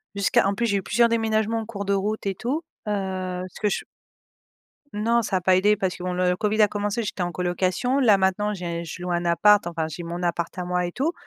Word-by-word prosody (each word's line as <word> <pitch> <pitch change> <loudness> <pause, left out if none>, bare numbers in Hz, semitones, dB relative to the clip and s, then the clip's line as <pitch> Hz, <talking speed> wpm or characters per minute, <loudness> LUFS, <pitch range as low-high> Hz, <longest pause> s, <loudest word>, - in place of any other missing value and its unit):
Jusqu'à 200 -1 +3
en 200 - +1
plus, 235 +3 0
j'ai 200 -2 +1
eu 195 - -3
plusieurs 235 +4 +3
déménagements 225 0 +1
en - - -7
cours 210 -2 -5
de 200 - +1
route 205 +1 -2
et 195 - -1
tout, 270 - -2 0.3
heu, 210 - 0 0.6
ce - - -13
que 210 - +2
ch - - -2 1.1
Non, 230 +3 +1
ça 195 - -1
a - - +1
pas 185 +1 +3
aidé 205 +3 +4
parce 190 -2 -1
que, 180 - -10
bon, 180 - -2
le 180 0 +1
Covid 215 +2 0
a 210 - +7
commencé, 205 +3 -2
j'étais 195 -2 -3
en 175 - -1
colocation. 185 - 0
Là, 215 -6 +5
maintenant, 195 +2 +1
j'ai 170 -2 -4
je 175 +2 -8
loue 180 - -2
un 175 0 0
appart, 205 +4 +4
enfin, 165 -2 -2
j'ai 165 +3 -7
mon 170 +1 -5
appart 170 0 -2
à 180 - -2
moi 180 0 0
et 175 - -6
tout 295 +6 0
195 Hz, 250 wpm, -24 LUFS, 180-215 Hz, 1.1 s, a